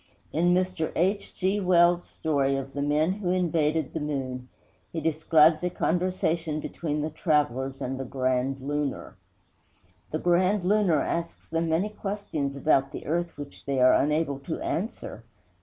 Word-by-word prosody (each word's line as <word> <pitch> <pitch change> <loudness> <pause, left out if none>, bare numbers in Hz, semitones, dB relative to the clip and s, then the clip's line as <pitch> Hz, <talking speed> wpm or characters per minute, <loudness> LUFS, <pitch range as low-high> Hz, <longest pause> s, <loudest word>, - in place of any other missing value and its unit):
In 175 +3 +3
Mr. 185 -3 -1
H. 195 +4 0
G. 195 +2 0
Wells' 175 -2 +4
story 140 -3 0
of 135 0 -5
the 140 - -3
men 150 +4 +2
who 190 -2 -3
invaded 160 -4 +1
the 160 - -2
moon, 130 -4 -4 0.4
he 165 - -3
describes 155 0 +4
a 180 - +1
conversation 170 -3 0
between 150 -1 -3
the 155 - -3
travelers 135 -4 0
and 130 +1 -3
the - - -2
Grand 130 0 -1
Lunar. 145 0 -3 0.9
The 155 - -2
Grand 180 +4 +2
Lunar 185 -6 +3
asks 170 0 -3
them 165 0 -1
many 170 +6 +1
questions 195 -10 -4
about 140 -2 +2
the - - -7
earth 170 +1 -2
which 145 -1 -9
they 140 -1 0
are 125 0 +6
unable 150 -1 +1
to 160 +4 -5
answer. 180 - -4
155 Hz, 155 wpm, -27 LUFS, 140-175 Hz, 0.9 s, are